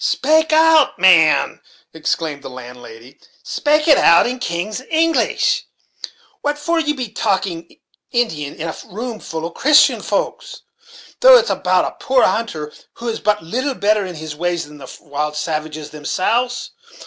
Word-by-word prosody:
"Spake 315 +3 +2
it - - +2
out, 320 -2 +4
man," 170 -4 +4 0.3
exclaimed 155 -2 -3
the 140 - -9
landlady; 125 0 -12 0.2
"spake 300 +1 0
it 295 -4 +6
out 170 0 +5
in 250 +1 -3
king's 210 +2 -4
English; 325 +1 +1 0.8
what 290 0 -1
for 335 +3 -1
should 320 - -3
ye 295 - +2
be 250 -4 -5
talking 190 -5 -3 0.3
Indian 160 - -2
in 165 - -5
a 160 - -5
room 225 +3 -6
full 160 -4 -6
of 170 - -6
Christian 300 +2 +4
folks, - - -4 0.6
though - - +8
it 480 - +3
is - - -4
about - - +1
a - - -8
poor 260 -1 +3
hunter, 155 -10 -3 0.2
who 235 0 -6
is 225 - -4
but 210 -5 0
little 255 - -3
better 210 -1 +1
in 180 -2 -7
his 155 -1 -7
ways 175 +1 -2
than 150 0 -14
the 135 - -11
wild 150 +1 -4
savages 155 -1 -4
themselves? 230 +11 -2
190 Hz, 165 wpm, -18 LUFS, 155-260 Hz, 0.8 s, though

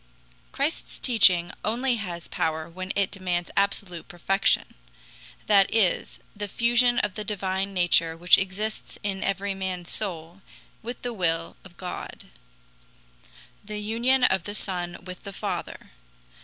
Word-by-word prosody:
Christ's 285 +4 -2
teaching 185 -8 +4
only 240 +3 +1
has 175 -5 -5
power 160 0 -1
when 185 +2 -5
it 200 -1 +1
demands 180 -3 -2
absolute 200 -3 0
perfection 195 +3 +1 0.7
that 200 -2 +5
is, 215 -5 +1 0.2
the 205 0 -3
fusion 240 +3 +3
of 210 -2 +1
the 210 - -4
divine 195 -1 -1
nature 175 -3 +3
which 175 +1 +6
exists 200 +3 -3
in 195 -2 -2
every 195 +1 0
man's 185 -2 -4
soul 175 -2 -5 0.4
with 240 +2 -6
the 245 -1 -2
will 165 -4 -1
of 175 -3 -15
God 180 -1 -6 1.4
the 210 +1 -6
union 235 +5 +2
of 190 -7 +3
the 205 - -4
Son 175 -4 -3
with 180 -1 -8
the 200 - -7
Father. 195 - -5
195 Hz, 135 wpm, -26 LUFS, 175-210 Hz, 1.4 s, which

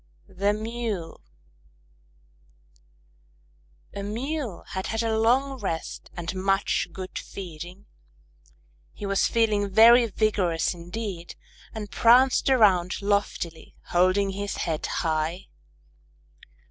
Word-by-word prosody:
_ 190 - -19
THE 200 +1 +3
MULE 215 - -4 2.7
A 200 - -5
Mule 235 - -4
had 190 0 -4
had 225 +1 -1
a 225 -1 0
long 260 +4 +2
rest 165 -6 -4
and 175 +1 -4
much 195 0 0
good 185 +2 -6
feeding. 180 +1 -9 1.1
He 205 - -7
was 195 0 +2
feeling 215 -3 +1
very 230 +4 +7
vigorous 195 -7 0
indeed, 175 0 -6 0.4
and 210 -2 -7
pranced 250 +4 +5
around 195 -8 +3
loftily, 200 -5 -2
holding 185 +3 +3
his 200 +1 -4
head 160 -3 -2
high. 160 +2 -2
200 Hz, 100 wpm, -26 LUFS, 180-225 Hz, 2.7 s, very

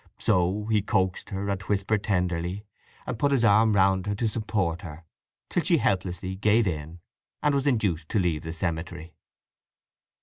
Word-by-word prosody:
So 90 +4 +1
he 110 -1 +2
coaxed 95 -3 -1
her, 100 0 -3
and 100 -1 -2
whispered 100 +2 0
tenderly, 90 0 -1 0.4
and 115 - -4
put 140 +2 +2
his 135 -4 +2
arm 110 0 +5
round 95 0 +3
her 105 - -1
to 115 +3 0
support 100 -6 -1
her; 80 -2 -9 0.4
till 175 - 0
she 170 +1 +3
helplessly 95 - -1
gave 110 +3 +3
in, 80 -1 -4 0.4
and 150 - +3
was 140 0 0
induced 95 - 0
to 105 - +1
leave 85 -5 0
the 80 - -6
cemetery. 85 0 -4
95 Hz, 165 wpm, -26 LUFS, 85-110 Hz, 0.4 s, arm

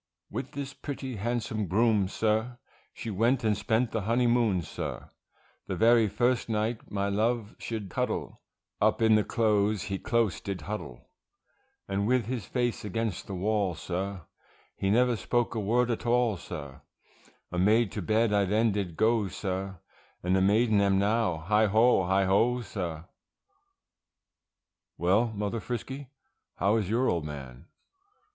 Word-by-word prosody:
With - - -5
this 140 0 -5
pretty 135 -4 -6
handsome 110 -1 -2
groom, 105 0 +3
sir, 110 +4 0 0.3
She 115 - -6
went 115 +6 +2
and 110 -1 +2
spent 110 +3 0
the 110 - -1
honey 115 +5 +1
moon, 115 -7 +2
sir, - - -6 0.6
The - - -2
very 115 -1 +5
first 120 +3 0
night 110 +1 -2
my 100 -1 -1
love 110 +2 0
should 105 -5 -5
cuddle, - - -3 0.4
Up 110 +1 +3
in 110 0 +5
the 105 -1 +4
clothes 105 -3 +1
he 100 -2 -3
close 110 -4 0
did 95 -4 -4
huddle; 70 - -7 0.8
And 100 +1 -1
with 125 -1 +2
his 120 -5 -4
face 120 -2 -1
against 105 -1 -3
the 100 - -5
wall, 100 -1 0
sir, 95 +2 -4 0.5
He 95 - -1
never 120 +3 +3
spoke 120 +3 0
a 115 - -2
word 120 +4 +1
at 120 +1 -3
all, 120 -2 +3
sir, 75 -6 -8 0.7
A 90 - -2
maid 105 +3 +3
to 105 - -4
bed 110 +4 +2
I 100 -1 +3
then 110 +4 +2
did 95 -5 -3
go, 110 -1 +2
sir, 95 0 -4 0.5
And 90 +1 +2
a 95 - +3
maiden 105 +2 +3
am 100 -1 +3
now, 100 -5 +1
heigho! 105 -1 +4
heigho! 100 +6 +2
sir. 85 -5 -5 1.9
Well, 95 +8 +3
Mother 105 0 -3
Frisky, 130 +4 -5 0.5
how 100 +4 +2
is 105 -4 -1
your 120 +4 +2
old 85 -3 0
man? 70 -2 -8
105 Hz, 150 wpm, -28 LUFS, 95-115 Hz, 1.9 s, very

